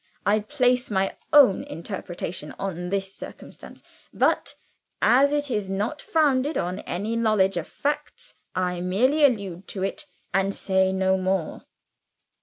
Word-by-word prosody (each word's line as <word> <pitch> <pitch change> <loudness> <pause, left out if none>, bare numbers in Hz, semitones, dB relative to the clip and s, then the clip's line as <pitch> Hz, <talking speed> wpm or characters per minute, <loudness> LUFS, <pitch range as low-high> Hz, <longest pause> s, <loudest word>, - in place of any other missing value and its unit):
I 210 +1 +3
place 250 +2 +1
my 195 -2 0 0.2
own 280 -10 +6
interpretation 170 -3 -6
on 180 -2 -4
this 195 0 -2
circumstance; - - -11 0.3
but - - +1 0.4
as 275 +3 +5
it 290 -2 -1
is 210 -4 -1
not 210 +10 -2
founded 295 -2 +1
on 180 +2 -2
any 205 +6 -3
knowledge 215 -4 +2
of 175 -2 -3
facts, 300 +12 -4 0.2
I 180 -1 -1
merely 250 +12 +2
allude 200 -9 +1
to 190 - -4
it, 195 +9 -3 0.3
and 195 +1 +1
say 190 -1 +2
no 190 0 +1
more." 185 -3 -2
195 Hz, 135 wpm, -25 LUFS, 190-255 Hz, 0.4 s, own